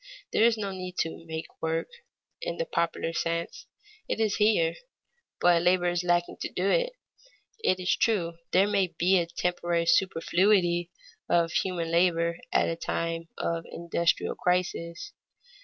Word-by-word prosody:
There 220 - +5
is 230 -1 +4
no 200 -2 -3
need 185 -1 -7
to 165 0 -4
"make 160 0 -7
work," 160 0 -1 0.5
in - - -3
the - - -1
popular 170 - -1
sense; 170 0 -3 0.4
it - - -2
is 215 -2 +1
here, 210 -6 +3 0.7
but 175 -1 +4
labor 175 0 +3
is 175 0 -1
lacking 175 0 +1
to - - -2
do 185 +2 -1
it. - - +1 0.7
It 185 - +2
is 180 0 +1
true 170 -7 0
there 190 +2 +5
may 200 -2 +2
be 180 +2 +2
a 170 - -1
temporary 170 0 -1
superfluity 175 0 +2 0.4
of 170 -1 +3
human 165 0 -1
labor 170 -1 +2
at - - +3
a 165 - -1
time 165 0 -3
of 165 0 -2
an - - -14
industrial 170 0 0
crisis. 180 - -2
175 Hz, 155 wpm, -28 LUFS, 170-185 Hz, 0.7 s, There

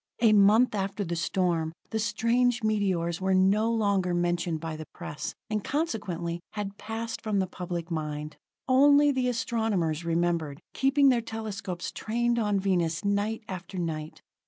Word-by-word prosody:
A 225 -2 +5
month 210 +4 +5
after 200 0 -2
the 170 -2 -3
storm, 165 -2 0 0.2
the 220 - -1
strange 235 +2 +1
meteors 190 -5 0
were 190 0 +2
no 200 +4 +3
longer 200 -5 +1
mentioned 175 -1 0
by 160 0 -5
the 155 -1 -8
press, 150 0 -5
and 210 -2 -2
consequently, 185 - -2
had 205 -2 -5
passed 225 +1 -5
from 215 -2 -1
the 190 - +2
public 175 -2 -5
mind. 150 -1 -4 0.3
Only 285 +2 +6
the 255 -2 0
astronomers 220 -10 -1
remembered, 165 -3 0
keeping 275 +1 +4
their 245 -2 +3
telescopes 215 -6 -5
trained 235 +2 0
on 210 -3 +1
Venus 180 -2 0
night 205 +3 0
after 185 0 -7
night. 155 -3 -4
195 Hz, 150 wpm, -28 LUFS, 170-225 Hz, 0.3 s, Only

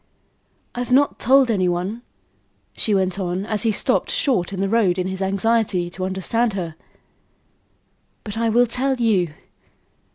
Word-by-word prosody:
"I've 245 +1 -4
not 280 +3 +3
told 265 -1 +4
any 185 -4 +1
one," 185 +7 -3 0.7
she 210 - +1
went 190 0 0
on, 185 +1 -2
as 215 -1 -1
he 225 -1 +2
stopped - - 0
short 260 - 0
in 195 - -5
the 195 - 0
road, 195 -4 +2
in 180 - -1
his 190 +1 -3
anxiety 195 -2 0
to 185 +1 -4
understand 205 +5 -1
her. 175 -4 -4 1.5
"But 210 -1 -7
I 230 0 0
will 240 +2 +4
tell 260 +3 0
you. 195 -10 +1
205 Hz, 155 wpm, -21 LUFS, 185-235 Hz, 1.5 s, told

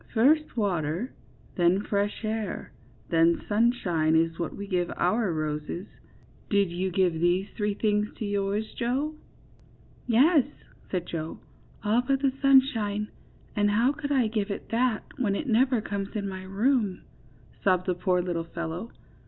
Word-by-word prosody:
First 290 +4 +3
water, 180 - -1 0.4
then 180 +3 +3
fresh 205 +2 -1
air, 220 0 -3 0.4
then 165 0 +4
sunshine, 200 -8 +2
is 165 +1 +2
what 170 - -3
we 200 - -6
give 180 -3 -1
our 215 +1 +1
roses; 155 +3 -3 0.6
did 200 -3 +2
you 185 +2 -1
give 185 -1 +2
these 175 +4 +1
three 205 -2 -1
things 210 0 +1
to 220 - -3
yours, 205 +1 -1
Joe?" 265 +6 -1 1.0
^'Yes," 280 +4 +5 0.4
said 180 -2 -2
Joe, 160 -2 -5 0.5
^^all 220 +4 +3
but 275 -1 +2
the 270 -2 +2
sunshine; 225 -7 +3 0.5
and 205 0 +3
how 230 +6 +3
could 290 -1 -5
I 265 -4 +3
give 215 -1 -1
it 200 - -5
that, 235 -1 +1 0.2
when 205 -6 +1
it 300 - -3
never 250 0 +3
comes 200 0 -4
in 200 -2 -2
my 190 -1 -6
room?" 210 0 +1 0.6
sobbed 185 -2 +3
the 185 - +1
poor 180 0 +1
little 170 -2 -2
fellow. 170 +6 -4
205 Hz, 150 wpm, -27 LUFS, 180-235 Hz, 1.0 s, ^'Yes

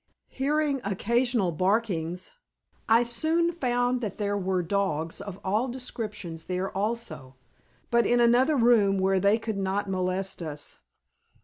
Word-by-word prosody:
Hearing 285 0 0
occasional 230 +1 +1
barkings, 180 -2 0 0.6
I 230 +2 +6
soon 315 +8 +1
found 245 -5 0
that 215 -4 -4
there 205 -1 -1
were 190 -2 0
dogs 165 -4 -1
of 200 -1 -7
all 210 +7 +1
descriptions 210 -10 -5
there 185 +1 -3
also, 195 - -3 0.6
but 235 0 +3
in 240 - +3
another 245 +5 +4
room 230 -6 +4
where 190 0 +2
they 200 +3 +4
could 220 -2 -4
not 195 +1 -1
molest 185 0 -2
us. 150 -3 -6
205 Hz, 130 wpm, -27 LUFS, 185-240 Hz, 0.6 s, I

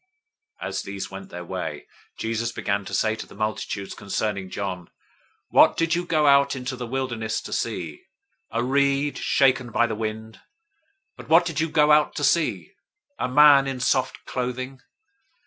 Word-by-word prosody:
011:007 - - -2
As - - -3
these 100 -1 -6
went 95 0 -9
their 90 0 -8
way, - - -5 0.3
Jesus 115 +1 -2
began 100 -2 -2
to - - -8
say 110 0 +1
to - - -8
the - - -15
multitudes 110 -2 -3
concerning 100 -1 -3
John, 90 -3 -5 0.6
"What - - +5
did 165 -1 +1
you 175 +1 -1
go 155 -3 +2
out 140 -1 +5
into 130 0 -4
the 125 -1 -6
wilderness 120 -4 -2
to - - -7
see? 85 -10 -4 0.4
A 115 +1 -1
reed 140 +2 +1
shaken 130 -3 +2
by 120 - +3
the 115 - -3
wind? 110 0 -5
011:008 - - -24 0.8
But - - -12
what 165 +2 +6
did 165 -2 -3
you 165 +1 0
go 150 0 +4
out 150 0 +4
to 145 - -3
see? 125 - +1 0.5
A - - -1
man 140 0 +7
in 135 -1 -3
soft 130 +1 0
clothing? 130 +1 -4
125 Hz, 175 wpm, -24 LUFS, 110-140 Hz, 0.8 s, man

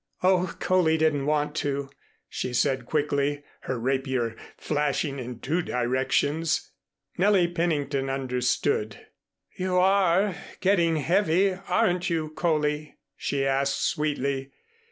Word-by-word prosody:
"Oh, 185 -1 +2
Coley 175 -4 +3
didn't 150 -3 +1
want 150 -1 +1
to," 140 -1 -2 0.4
she 125 - -4
said 130 -1 +1
quickly, 145 -1 0 0.3
her 130 - 0
rapier 130 -2 -1 0.2
flashing 145 -1 -1
in 125 -1 -6
two 160 +7 0
directions. 135 +5 0 0.5
Nellie 190 -2 +4
Pennington 155 -6 -1
understood. 125 -4 -1 0.6
"You 185 0 -1
are 190 +1 +3 0.3
getting 170 -4 +3
heavy, 180 +4 +2
aren't 185 -1 0
you, 160 -2 -1
Coley?" 150 -2 -1 0.2
she 140 -1 -1
asked 135 0 +1
sweetly. 140 -3 -1
150 Hz, 110 wpm, -26 LUFS, 135-175 Hz, 0.6 s, Nellie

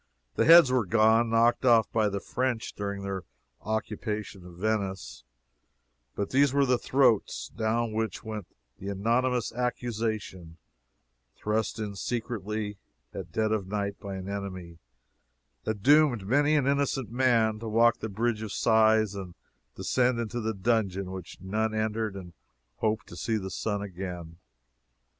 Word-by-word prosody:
The - - +1
heads 165 -4 +8
were 125 -6 +1
gone 115 +2 +4
(knocked 115 +2 +3
off 115 -3 +4
by 110 -2 +2
the 100 0 -3
French 120 0 -2
during 100 -1 -4
their 100 -1 -3 0.4
occupation 105 -2 -4
of 90 - -13
Venice,) 100 - -2 0.9
but 100 - -3
these 140 0 +4
were 140 0 +3
the 125 -2 +2
throats, 130 -6 +2
down 110 +1 -1
which 110 -3 -2
went 110 -4 -6 0.3
the 95 - -7
anonymous 120 +5 0
accusation, 110 -8 -3 0.8
thrust 105 -1 -1
in 105 -2 -4
secretly 105 -2 -3 0.3
at - - -7
dead 110 -1 0
of 105 -4 -1
night 100 0 -3
by 100 -2 -6
an 95 0 -6
enemy, 95 -4 -6 0.9
that 105 -3 -3
doomed 145 -7 +5
many 145 +7 +3
an 145 -3 +2
innocent 140 -3 0
man 115 -4 +2
to 115 - -6
walk 115 +2 +4
the 110 - -4
Bridge 110 +2 -1
of 110 -2 -5
Sighs 110 -2 +3
and 95 -3 -7 0.4
descend 125 -1 +1
into 115 0 -3
the 110 0 -2
dungeon 100 -3 0
which 95 -2 -8
none 110 +3 -1
entered 110 -1 -1
and 90 -3 -9 0.4
hoped 110 0 -1
to - - -11
see 115 -2 -1
the 95 -2 -5
sun 100 +2 -2
again. 90 -3 -7
110 Hz, 150 wpm, -28 LUFS, 100-120 Hz, 0.9 s, heads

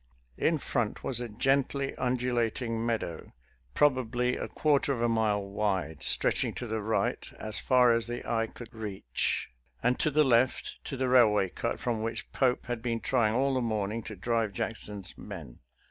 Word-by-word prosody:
In 160 - +3
front 120 -6 -2
was 125 -3 +1
a 120 -1 -4
gently 135 +4 +1
undulating 120 -2 -1
meadow, 110 -8 -3 0.4
probably 125 -3 +2
a - - -4
quarter 145 -2 +2
of 125 - -4
a - - +4
mile 110 -3 +1
wide, 100 -7 -1
stretching - - +1
to 125 - -4 0.2
right 110 +2 0
as 110 -1 -4
far 125 -2 +5
as 115 0 0
the 120 0 -5
eye 115 -1 +1
could 120 +1 -11
reach, 100 - -2 0.3
and 125 +1 +2
to 155 - +3
the 150 +1 +4
left 130 0 +2
to 135 - -4
the 130 0 0
railroad 105 -7 +4
cut - - -2
from 115 -3 -1
which 115 +1 -3
Pope 125 -2 +1
had 120 -1 -3
been 115 -1 -1
trying 115 -3 +2
all 135 +2 +2
the 130 - +1
morning 110 -1 -1
to 110 - -6
drive 115 +1 0
Jackson's 105 -2 -5
men. 80 -12 -9
115 Hz, 170 wpm, -29 LUFS, 105-125 Hz, 0.4 s, far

